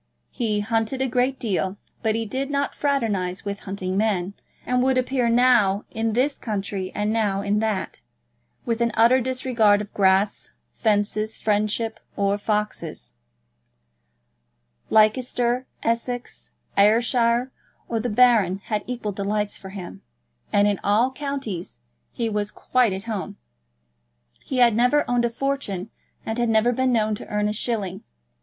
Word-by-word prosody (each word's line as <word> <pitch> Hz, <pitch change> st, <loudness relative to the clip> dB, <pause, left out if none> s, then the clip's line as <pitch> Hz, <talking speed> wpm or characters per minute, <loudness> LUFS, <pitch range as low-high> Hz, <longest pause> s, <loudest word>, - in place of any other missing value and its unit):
He 215 Hz, -4 st, -1 dB
hunted 225 Hz, +4 st, -1 dB
a 265 Hz, -, +1 dB
great 255 Hz, +2 st, 0 dB
deal, 195 Hz, -3 st, -1 dB, 0.2 s
but 220 Hz, -2 st, +1 dB
he 225 Hz, 0 st, -1 dB
did 265 Hz, +6 st, -3 dB
not 280 Hz, 0 st, -1 dB
fraternise 210 Hz, -10 st, -1 dB
with 200 Hz, 0 st, -3 dB
hunting 190 Hz, -1 st, -4 dB
men, 200 Hz, -3 st, 0 dB, 0.3 s
and 250 Hz, 0 st, +1 dB
would 260 Hz, 0 st, +2 dB
appear 255 Hz, -1 st, +1 dB
now 230 Hz, -5 st, +4 dB
in 225 Hz, 0 st, -1 dB
this 265 Hz, +5 st, +1 dB
county 200 Hz, -3 st, -3 dB
and 210 Hz, +1 st, 0 dB
now 205 Hz, -3 st, +1 dB
in 205 Hz, +1 st, +1 dB
that, 215 Hz, -3 st, -2 dB, 0.6 s
with 235 Hz, -1 st, -1 dB
an 235 Hz, -, +3 dB
utter 240 Hz, +3 st, +5 dB
disregard 245 Hz, -5 st, +2 dB
of 210 Hz, -1 st, -7 dB
grass, 195 Hz, +1 st, +2 dB, 0.2 s
fences, 215 Hz, 0 st, 0 dB
friendships, 215 Hz, +1 st, -1 dB, 0.2 s
or 200 Hz, 0 st, +1 dB
foxes. 210 Hz, -, -3 dB, 1.8 s
Leicester, 240 Hz, +3 st, +2 dB, 0.2 s
Essex, 235 Hz, +1 st, -3 dB, 0.3 s
Ayrshire, 235 Hz, +4 st, +3 dB, 0.4 s
or 230 Hz, -, -1 dB
the 245 Hz, +2 st, -2 dB
Baron 215 Hz, -5 st, +4 dB
had 210 Hz, +1 st, -3 dB
equal 240 Hz, -4 st, -3 dB
delights 205 Hz, +1 st, -2 dB
for 190 Hz, -, -9 dB
him; 190 Hz, -3 st, -8 dB, 0.5 s
and 205 Hz, 0 st, +4 dB
in 205 Hz, -1 st, 0 dB
all 220 Hz, +6 st, +3 dB
counties 265 Hz, -10 st, -5 dB, 0.3 s
he 230 Hz, -, -2 dB
was 210 Hz, -1 st, -1 dB
quite 250 Hz, 0 st, +1 dB
at 190 Hz, +1 st, -4 dB
home. 220 Hz, -4 st, -5 dB, 1.1 s
He 260 Hz, -, -4 dB
had 240 Hz, -3 st, +5 dB
never 250 Hz, +5 st, +3 dB
owned 245 Hz, -1 st, +2 dB
a -, -, +1 dB
fortune, 230 Hz, -7 st, -3 dB, 0.3 s
and 220 Hz, +2 st, -3 dB
had 240 Hz, -1 st, +1 dB
never 225 Hz, +2 st, +3 dB
been 260 Hz, +1 st, +1 dB
known 215 Hz, -2 st, +2 dB
to 210 Hz, -, -6 dB
earn 210 Hz, 0 st, 0 dB
a 210 Hz, -, -1 dB
shilling. 205 Hz, -4 st, -2 dB
220 Hz, 145 wpm, -23 LUFS, 205-245 Hz, 1.8 s, utter